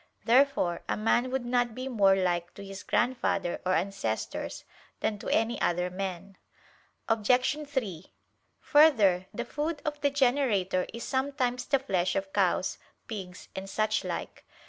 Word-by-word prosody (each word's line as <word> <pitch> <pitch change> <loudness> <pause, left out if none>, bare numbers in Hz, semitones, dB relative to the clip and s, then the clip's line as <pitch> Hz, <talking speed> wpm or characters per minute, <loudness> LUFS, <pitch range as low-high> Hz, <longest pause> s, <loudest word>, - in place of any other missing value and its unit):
Therefore 245 -8 +3
a - - 0
man 230 +4 +2
would 260 -1 -2
not 240 -2 +1
be 255 +1 -4
more 200 -6 +4
like 175 -2 -1
to 200 - -9
his 195 0 -8
grandfather 240 -7 0
or 185 - +3
ancestors, 185 - -3 0.4
than 210 -2 -1
to - - -5
any 225 +2 +1
other 180 +1 +1
men. 190 0 -5 0.7
Obj. 250 +7 +2
3: 200 - -4 0.5
Further, 215 - +5
the 240 - -4
food 300 +4 -3
of 295 -1 -3
the 285 - +3
generator 245 -10 +1
is 235 +1 -7
sometimes 260 -2 -1
the 280 - +3
flesh 185 -9 0
of 195 0 -3
cows, - - +1 0.3
pigs 190 -5 -8
and 190 +1 -5
suchlike. 215 +2 -2
220 Hz, 145 wpm, -29 LUFS, 190-260 Hz, 0.7 s, Further